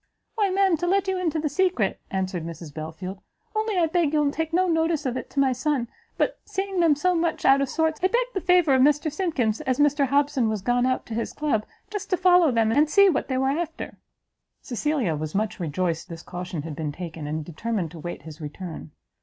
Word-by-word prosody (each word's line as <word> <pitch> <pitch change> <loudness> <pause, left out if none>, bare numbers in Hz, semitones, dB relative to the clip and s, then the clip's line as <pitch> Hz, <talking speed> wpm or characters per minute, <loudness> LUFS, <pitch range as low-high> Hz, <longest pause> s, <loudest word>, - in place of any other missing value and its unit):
"Why, 415 -3 +1
ma'am, 380 -2 +3
to 350 +3 -2
let 390 +1 +2
you 380 -1 0
into 330 -3 0
the 310 0 0
secret," 295 - +1
answered 185 -3 -2
Mrs 165 -2 -8
Belfield, 160 +5 -6 0.4
"only 435 -2 0
I 345 - +4
beg 320 -2 +1
you'll 295 -2 +2
take 320 +1 -3
no 365 +2 +2
notice 325 -2 +1
of 255 -2 -1
it - - -5
to 280 - -3
my 270 -1 +4
son, 255 -1 0 0.3
but, - - 0
seeing 385 -1 -3
them 330 -4 +5
so 360 +5 +1
much 335 -1 -1
out 275 +1 +6
of 275 - 0
sorts, 320 -1 0
I 370 - +4
begged - - 0
the 385 - -2
favour 355 -5 +4
of 260 - +4
Mr 295 +3 +3
Simkins, 300 - 0
as 260 -4 0
Mr 290 -1 +3
Hobson 280 -3 +2
was 215 -3 -3
gone 245 +2 +2
out 255 - -1
to 230 - -7
his 230 +1 -3
club, 285 -8 -1 0.2
just 415 -3 -5
to 370 - +2
follow 360 -3 +5
them, 225 -3 +2
and 295 +5 +3
see 400 +5 +6
what 345 - 0
they 260 - -1
were 265 +1 +2
after." 325 +2 -4 0.6
Cecilia 255 - -1
was 155 +2 -5
much 215 +1 -1
rejoiced 170 0 -2
this 165 0 -8
caution 180 -3 -5
had 160 -2 -6
been 150 -1 -3
taken, 160 -2 -7
and 155 0 -3
determined 175 +1 -3
to 165 - -10
wait 175 0 -6
his 160 +1 -10
return. 155 +2 -7
275 Hz, 225 wpm, -25 LUFS, -, 0.6 s, out